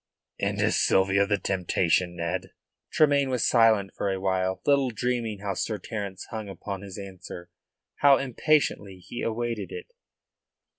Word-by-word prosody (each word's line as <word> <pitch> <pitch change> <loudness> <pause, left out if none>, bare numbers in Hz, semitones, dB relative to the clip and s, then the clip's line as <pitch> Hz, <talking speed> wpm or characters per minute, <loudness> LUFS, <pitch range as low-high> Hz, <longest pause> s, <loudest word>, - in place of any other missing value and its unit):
"And - - -1
is - - +2
Sylvia 95 +1 +3
the 100 0 +2
temptation, 90 -2 0
Ned?" 90 +2 -3 0.4
Tremayne 140 -3 +3
was 125 -2 +1
silent 110 -5 +4
for 100 - -1
a 95 - -2
while, 95 0 0
little 140 -2 +3
dreaming 115 -3 -2
how 100 -1 -2
Sir 105 +3 -2
Terence 100 -4 -6
hung 110 -3 -5
upon 95 +1 -6
his 100 -2 -9
answer, 95 -3 -9 0.5
how 140 -1 +6
impatiently 130 -7 0
he 90 +6 -8
awaited 115 +1 -2
it. 450 +2 -8
100 Hz, 145 wpm, -26 LUFS, 95-120 Hz, 0.5 s, how